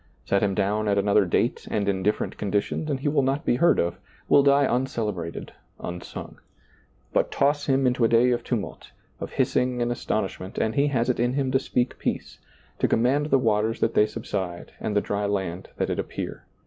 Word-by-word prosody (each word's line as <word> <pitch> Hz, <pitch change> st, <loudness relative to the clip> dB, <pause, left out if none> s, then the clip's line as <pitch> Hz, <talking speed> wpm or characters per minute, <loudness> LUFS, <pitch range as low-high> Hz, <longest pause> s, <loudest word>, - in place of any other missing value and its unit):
Set 100 Hz, -, +2 dB
him 100 Hz, -2 st, +1 dB
down 105 Hz, +2 st, 0 dB
at 100 Hz, -1 st, +2 dB
another 100 Hz, 0 st, +3 dB
date 85 Hz, -, 0 dB
and 100 Hz, -1 st, -1 dB
in 95 Hz, -2 st, 0 dB
different 105 Hz, +3 st, 0 dB
conditions 105 Hz, +9 st, -1 dB
and 135 Hz, -2 st, -1 dB
he 145 Hz, -, -1 dB
will 145 Hz, -1 st, +3 dB
not 135 Hz, +2 st, 0 dB
be 120 Hz, -, +2 dB
heard 170 Hz, +4 st, +4 dB
of 85 Hz, +1 st, -1 dB
— -, -, -30 dB
will 140 Hz, -, +7 dB
die 140 Hz, 0 st, +4 dB
uncelebrated, 110 Hz, -10 st, -2 dB, 0.3 s
unsung. 90 Hz, 0 st, -7 dB, 0.7 s
But -, -, +2 dB
toss 145 Hz, +1 st, +1 dB
him 135 Hz, -1 st, +2 dB
into 125 Hz, -1 st, +2 dB
a -, -, +6 dB
day 120 Hz, +2 st, +4 dB
of 120 Hz, -, 0 dB
tumult, 115 Hz, -6 st, -4 dB, 0.3 s
of -, -, -6 dB
hissing 125 Hz, -1 st, +1 dB
and 120 Hz, 0 st, 0 dB
astonish 110 Hz, -4 st, -2 dB
ment, 95 Hz, +2 st, -8 dB
and 110 Hz, -, 0 dB
he 140 Hz, +1 st, +2 dB
has 125 Hz, -4 st, 0 dB
it -, -, -5 dB
in 120 Hz, +1 st, +1 dB
him 135 Hz, -1 st, 0 dB
to 130 Hz, -, +3 dB
speak 125 Hz, -2 st, -1 dB
peace, -, -, -3 dB, 0.4 s
to -, -, +3 dB
command 135 Hz, +6 st, +2 dB
the 135 Hz, -, +4 dB
waters 110 Hz, -2 st, +1 dB
that 115 Hz, -, +2 dB
they 105 Hz, -, +4 dB
subside 95 Hz, -6 st, -5 dB
and 105 Hz, -, -3 dB
the 105 Hz, -, +4 dB
dry 100 Hz, 0 st, -2 dB
land 95 Hz, -3 st, -3 dB
that -, -, -1 dB
it -, -, -2 dB
appear. -, -, -5 dB
115 Hz, 210 wpm, -25 LUFS, 100-130 Hz, 0.7 s, will